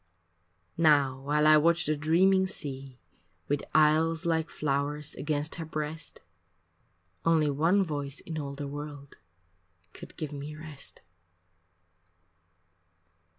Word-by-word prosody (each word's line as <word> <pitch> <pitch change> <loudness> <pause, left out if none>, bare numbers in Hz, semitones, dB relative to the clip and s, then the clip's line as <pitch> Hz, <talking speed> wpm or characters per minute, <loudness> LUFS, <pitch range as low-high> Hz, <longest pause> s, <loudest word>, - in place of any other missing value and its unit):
Now 140 -5 +4
while 150 +2 +1
I 155 0 +8
watch 170 +2 +3
the 155 - +1
dreaming 185 +6 +3
sea 135 -7 -6 0.5
With 145 0 0
isles 160 +2 +3
like 160 -1 0
flowers 145 +1 -1
against 150 0 -2
her - - -4
breast, 155 +1 -3 1.0
Only 160 -3 +3
one 165 +8 +3
voice 145 -4 -4
in 160 -1 -6
all 140 -1 -5
the 145 0 -5
world 145 -1 -8 0.8
Could - - -12
give 155 -2 -5
me 145 +1 -7
rest. 155 -2 -10
150 Hz, 110 wpm, -29 LUFS, 145-160 Hz, 1.0 s, I